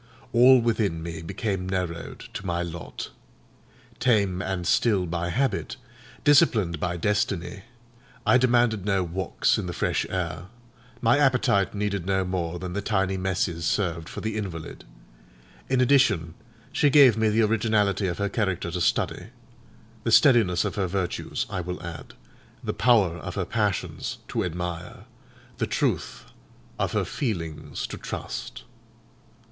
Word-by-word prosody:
All 125 +2 +7
within 110 -8 0
me 80 -1 -6
became 95 +2 -3
narrowed 90 -3 -3
to - - -5
my 85 -2 -1
lot. 85 0 -7 0.9
Tame 100 -7 +2
and 95 -3 -3
still 100 -1 +2
by 85 0 -2
habit, 135 +8 -1 0.5
disciplined 115 - +4
by 90 +2 -2
destiny, 100 0 -1 0.6
I 130 - +5
demanded 120 -4 +3
no 95 -2 +1
walks 90 +2 0
in - - -4
the 90 - -4
fresh - - 0
air; 90 -2 -3 0.5
my 120 +4 +4
appetite 125 -9 +2
needed 100 -3 -2
no 95 -1 +1
more 90 -2 -2
than 90 0 -5
the 100 - -2
tiny 95 -2 0
messes 95 -3 -1
served 85 -3 -1
for - - -7
the 110 0 -3
invalid. 85 -7 -6 0.8
In 130 -1 +2
addition, 115 - +3 0.4
she 145 0 +3
gave 135 -5 +7
me 110 -1 +2
the 110 +2 +3
originality 105 -3 +1
of 85 - -2
her 100 - 0
character 95 -5 -1
to 90 +1 -3
study: - - 0 0.8
the 115 - 0
steadiness 110 - +5
of - - -2
her 95 -2 +1
virtues, 90 -1 -2
I 95 -2 -3
will 90 +1 -5
add, 85 -2 -8 0.5
the - - -2
power 105 -8 +3
of - - -7
her - - -1
passions, - - -2
to - - -1
admire; 90 -1 -5 0.5
the - - 0
truth - - -1 0.5
of - - -1
her - - +1
feelings 85 - -4
to - - -7
trust. - - -6
95 Hz, 145 wpm, -26 LUFS, 85-110 Hz, 0.9 s, All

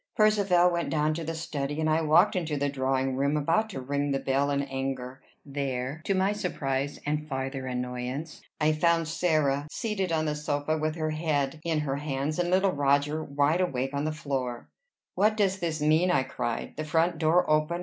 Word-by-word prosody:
Percivale 200 -5 +4
went 170 -1 -1
down 155 0 +1
to 165 +1 -4
the 165 +1 -4
study; 145 -2 -3
and 155 - +1
I 155 +1 +2
walked 165 +6 +4
into 160 -5 -1
the 140 0 0
drawing 130 -1 0
room, 140 +3 +1
about 165 +9 +1
to 180 - -5
ring 140 +2 -1
the 135 - +1
bell 135 +2 +1
in 140 0 0
anger. 135 -1 -4 0.2
There, 135 0 -3
to 195 - +1
my 190 +2 +2
surprise 140 -8 -2
and 150 +1 -1
farther 135 -1 -3
annoyance, 125 +4 -4 0.2
I 155 0 +3
found 165 +1 +2
Sarah, 155 -4 +1
seated 200 -5 -2
on 160 -1 +1
the 150 - 0
sofa 150 +1 -1
with 155 0 -1
her 155 -2 -1
head 155 -2 -1
in 160 -2 0
her 140 -2 -2
hands, 145 +2 -2
and 175 0 +1
little 190 +1 +3
Roger 145 +2 +1
wide 145 +5 +1
awake 135 -6 -1
on 140 +1 -1
the 155 - 0
floor. 135 -6 -4 0.4
"What 215 +1 +2
does 195 -2 +1
this 160 -3 -2
mean?" 160 +4 +4
I 155 -7 +3
cried. 125 -3 -4
"The 155 - -2
front 165 +1 +1
door 170 +3 +3
open! 155 +3 +1
150 Hz, 195 wpm, -28 LUFS, 140-165 Hz, 0.4 s, Percivale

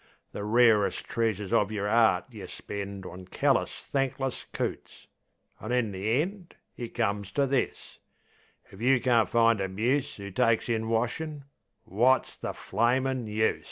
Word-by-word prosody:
The 100 - -5
rarest 110 -1 +3
treasures 105 -4 -1
of 105 0 +3
yer 105 -2 -2
'eart 110 -4 +4
yeh 105 -5 -8
spend 100 -1 -6
On 90 0 -8
callous, - - 0
thankless 135 -1 -2
coots; - - -5 0.5
an' 110 - -6
in 125 -4 +1
the 105 +6 0
end 185 -1 -9 0.2
It 120 -2 -7
comes 100 -4 -1
to 140 - +2
this: 135 -1 -2 0.7
if 95 - -12
you 130 +1 +4
can't 120 -3 +3
find 115 -3 +3
a 95 - -1
muse 120 +7 -1
'Oo 100 0 -7
takes 115 +2 +2
in 110 -1 0
washin', 140 +6 -1 0.4
wot's 120 +5 +2
the - - -5
flamin' 125 +3 0
use? 110 +1 +1
115 Hz, 150 wpm, -28 LUFS, 105-125 Hz, 0.7 s, eart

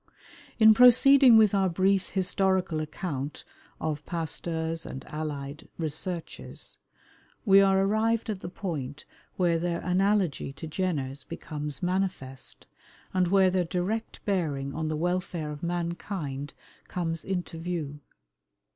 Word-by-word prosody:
In 220 -1 +8
proceeding 250 +1 +8
with 215 -2 +5
our 195 -2 +3
brief 190 +2 +2
historical 185 -2 +1
account 150 -2 -4 0.4
of 150 -2 -3
Pasteur's 165 0 -3
and 130 - -7
allied 150 -1 -5
researches, 165 +2 -5 0.7
we 195 -2 +7
are 195 -1 +4
arrived 220 +4 +1
at 210 -4 -3
the 175 - -6
point 150 -7 -5 0.3
where 170 -3 +2
their 170 0 -1
analogy 185 -6 +1
to 160 - -8
Jenner's 155 -5 -2
becomes 150 -3 -6
manifest, 180 -8 -2 0.5
and 185 -1 +2
where 190 0 +4
their 185 -1 +2
direct 190 +7 -3
bearing 145 -9 -1
on 160 0 -2
the 155 0 -1
welfare 175 -2 -2
of 150 - -8
mankind 170 -4 -3 0.3
comes 165 -2 -3
into 180 -3 -3
view. 165 -4 -4
175 Hz, 120 wpm, -28 LUFS, 155-190 Hz, 0.7 s, In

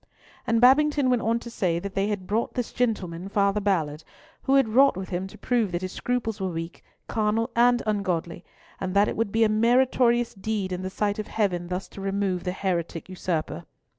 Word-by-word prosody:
And 230 0 +3
Babington 275 +2 +4
went 245 -2 +2
on 230 +1 +1
to 235 - -9
say 180 -7 0
that 195 +3 -5
they 195 0 0
had 205 -3 -3
brought 215 +4 -1
this 245 -3 -2
gentleman, 195 -7 -2
Father 200 0 +1
Ballard, 160 -6 0 0.4
who 270 - +2
had 270 -4 +4
wrought 265 -1 +5
with 190 0 -5
him 185 +1 -3
to - - -13
prove 235 -6 0
that 175 +1 -3
his 185 - -3
scruples 225 -4 -2
were 190 - -1
weak, 165 0 -6 0.2
carnal, 225 +2 0
and 240 +1 +4
ungodly, 185 -5 -2 0.4
and 190 0 -3
that 200 +1 +5
it - - -2
would 225 -2 -1
be 225 +2 +3
a - - +5
meritorious 240 +1 +3
deed 200 -1 -3
in 180 0 -3
the 185 - -3
sight 205 +2 -1
of 215 - -4
Heaven 180 -5 -1
thus 180 +2 -4
to 195 - -10
remove 195 -2 -1
the 180 - 0
heretic 180 -3 -3
usurper. 170 - -3
200 Hz, 205 wpm, -25 LUFS, 185-230 Hz, 0.4 s, wrought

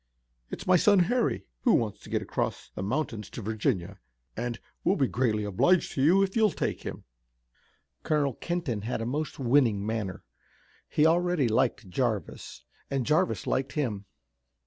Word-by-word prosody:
It's - - -6
my 185 0 +5
son 205 +3 +5
Harry, 240 +6 +1 0.2
who 240 - +4
wants 110 -4 -1
to - - -13
get - - -1
across - - -3
the - - -5
mountains 115 0 -2
to - - -7
Virginia, 105 -3 -1 0.4
and 120 0 -3 0.2
we'll 195 - +3
be 140 - +2
greatly 110 -5 0
obliged 105 - +2
to 135 - -2
you 180 +8 +5
if 190 -1 -2
you'll 220 -2 +4
take - - -3
him." - - -7 1.0
Colonel 145 -4 +1
Kenton 165 -8 -3
had 115 +3 -3
a - - -3
most 150 +5 -3
winning 120 -6 +2
manner. 105 -4 -3 0.7
He 150 - +3
already 175 -3 +3
liked 110 -2 +1
Jarvis, 110 0 -3 0.3
and 135 -3 -1
Jarvis 115 - +1
liked 130 +1 -1
him. 115 -10 -2
130 Hz, 160 wpm, -28 LUFS, 110-160 Hz, 1.0 s, my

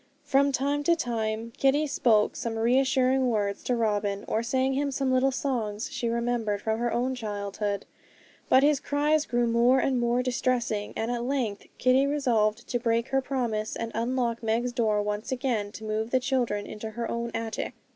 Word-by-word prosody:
From 280 +1 +3
time 280 +2 0
to 340 - +4
time 230 -5 -3
Kitty 280 +3 +3
spoke 225 -7 +2
some 230 -1 -3
reassuring 260 +2 +3
words 205 -3 -1
to 250 - +1
Robin, 205 -3 -1
or 220 - 0
sang 260 +2 0
him 280 +1 0
some 270 -1 0
little 260 +1 +3
songs 235 -5 -2
she 245 -3 -2
remembered 235 -3 -1
from 220 +1 -1
her 240 0 0
own 250 +2 0
childhood; 205 -3 -3 0.6
but 260 - +6
his 290 -1 +4
cries 295 +2 +1
grew 240 0 +1
more 235 +2 +4
and 260 -1 +1
more 240 +1 +1
distressing, 245 -4 -1
and 225 +2 -2
at 240 -1 -2
length 245 -6 -2
Kitty 255 +2 +3
resolved 240 -6 +1
to 245 - -1
break 230 0 0
her 270 0 +2
promise, 235 -5 -2
and 230 0 -4
unlock 235 0 -1
Meg's 230 +2 0
door 220 -4 +1
once 210 +5 -3
again 245 -6 -1
to 220 - -9
move 215 +1 -2
the 260 - +2
children 245 -6 -1
into 215 +1 -6
her 235 +2 -4
own 235 0 -3
attic. 225 -1 -3
240 Hz, 180 wpm, -27 LUFS, 220-260 Hz, 0.6 s, but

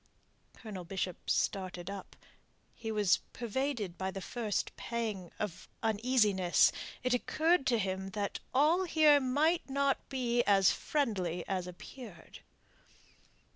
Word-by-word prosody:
Colonel 200 -5 -8
Bishop 185 0 -4
started 185 -2 -1
up. 195 -1 -7 0.6
He 225 -1 -5
was 210 -4 +3 0.2
pervaded 235 -5 -2
by 190 0 -1
the 195 +1 -5
first 215 +1 -2
pang 215 -7 -4
of 205 -5 -5 0.2
uneasiness. 215 -5 +3 0.3
It 255 0 +1
occurred 315 +5 +2
to 240 - +3
him 190 -2 -2
that 200 -1 -2
all 315 +8 +3
here 310 -3 +5
might 290 +5 +1
not 275 0 0
be 245 -3 +1
as 195 -3 +5
friendly 190 - -1
as 185 -2 -2
appeared. 180 +1 -11
215 Hz, 120 wpm, -32 LUFS, 190-265 Hz, 0.6 s, here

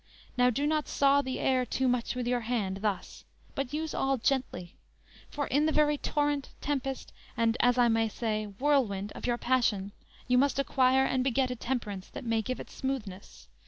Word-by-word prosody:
Now 250 0 +4
do 275 +4 -1
not 305 0 0
saw 280 0 +3
the 260 -1 -4
air 255 -1 +2
too 260 +1 -1
Much 250 0 0
with 250 -1 -2
your 245 0 +1
hand, 220 -5 -2
thus; 210 -3 -3 0.3
but 275 -2 -3
use 310 +1 -3
all 270 0 +1
gently; 240 - -1 0.6
For 290 -1 -3
in 290 +4 +2
the - - +2
very 300 -1 +3
torrent, 290 -2 -1
tempest, 270 -2 -3 0.2
and, 230 0 +2
As 245 0 +3
I 245 -1 +5
may 225 -1 +2
say, 215 -1 -2
whirlwind 210 -3 0
of - - -6
your 240 -1 +1
passion, 230 -6 +1 0.4
You 250 0 +4
must 280 +1 +2
acquire 265 -1 +3
and 260 -1 +1
beget 260 0 +1
a - - -2
temperance, 225 -6 -4
That - - -9
may 225 -1 +1
give 255 +4 -4
it - - -9
smoothness. 205 - -5
250 Hz, 190 wpm, -29 LUFS, 225-275 Hz, 0.6 s, I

